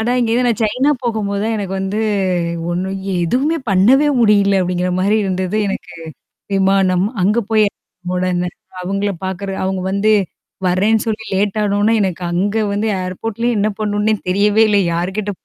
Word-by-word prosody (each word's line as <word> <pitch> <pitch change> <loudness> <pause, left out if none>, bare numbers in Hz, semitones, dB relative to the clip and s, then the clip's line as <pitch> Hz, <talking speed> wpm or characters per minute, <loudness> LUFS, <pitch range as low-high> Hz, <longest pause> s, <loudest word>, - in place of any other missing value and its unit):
ஆனா 230 +2 0
இங்கேருந்து 240 +1 +1
நான் 230 -1 -1
சைனா 250 +7 +2
போகும்போது 205 -4 -1
தான் 225 - 0
எனக்கு 195 -2 -4
வந்து 195 +2 -2 0.7
ஒண்ணும், 190 +2 -2 0.3
"எதுவுமே 275 - +1
பண்ணவே 235 +10 +4
முடியல." 200 -3 +4
அப்படிங்கிற 180 0 -1
மாரி 200 +3 +2
இருந்தது 185 +1 -1
எனக்கு 195 - -5 0.6
விமானம். 190 -1 +2 0.2
அங்க 210 +5 +3
போயி 215 -1 +4 0.5
உடன 180 -1 0 0.3
அவுங்கள 195 +2 -1
பார்க்கறது 190 +1 -4
அவுங்க 190 0 -1
வந்து 200 +2 +2 0.6
வரேன்னு 205 +5 +2
சொல்லி 220 0 -2
லேட் 200 +2 0
ஆன 205 -1 0
ஒன்ன, 220 +2 +3
எனக்கு 185 -2 -2
அங்க 200 +5 0 0.2
வந்து 210 +2 -1
ஏர்போர்ட்லயே 225 +6 -2
என்ன 205 +1 +2
பண்ணனுன்னே 210 0 0 0.2
தெரியவே 205 +3 +3
இல்ல. 205 -1 +3
யார்கிட்ட 190 +5 -2
200 Hz, 150 wpm, -17 LUFS, 190-220 Hz, 0.7 s, பண்ணவே